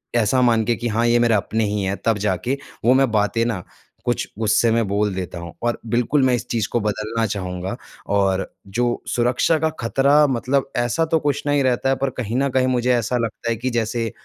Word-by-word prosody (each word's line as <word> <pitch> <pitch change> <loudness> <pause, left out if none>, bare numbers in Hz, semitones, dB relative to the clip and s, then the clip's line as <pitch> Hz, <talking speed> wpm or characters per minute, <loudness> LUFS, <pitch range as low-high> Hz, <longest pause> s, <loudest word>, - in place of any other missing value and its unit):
ऐसा 120 +2 +3
मान 115 -2 +3
के 120 - +1
कि 120 +1 -3
हाँ, 115 +1 +1
ये 120 0 +4
मेरा 115 -2 +3
अपने 110 +3 -1
ही 105 0 -1
हैं 95 +1 -1
तब 115 -2 +2
जाके 105 +7 -1 0.3
वो 125 - +6
मैं 135 -1 +3
बातें 110 +2 +1
ना 105 -7 -2 0.4
कुछ - - -1
गुस्से 110 +1 +3
में 115 -2 +1
बोल 100 0 0
देता 90 -2 -5
हूँ। 85 -1 -8
और 120 0 0
बिल्कुल 120 +5 +1
मैं 130 - +3
इस 120 0 -5
चीज़ 115 -4 0
को 120 - +1
बदलना 110 +2 -1
चाहूँगा 95 -2 -4 0.4
और 95 -1 +1 0.2
जो 120 +4 -1
सुरक्षा 125 +7 +2
का 160 0 +1
ख़तरा 140 +5 +3
मतलब 135 +1 0
ऐसा 120 +7 +1
तो 160 0 +1
कुछ 145 -1 -1
नहीं 145 -1 +2
रहता 130 0 +1
है 135 - +3
पर 135 0 -1
कहीं 115 -1 -3
न 140 0 +1
कहीं 130 0 +1
मुझे 125 -1 +1
ऐसा 120 +1 0
लगता 115 0 -3
है 115 - +1
कि 125 +3 -3
जैसे 115 -1 -1
115 Hz, 220 wpm, -21 LUFS, 105-125 Hz, 0.4 s, वो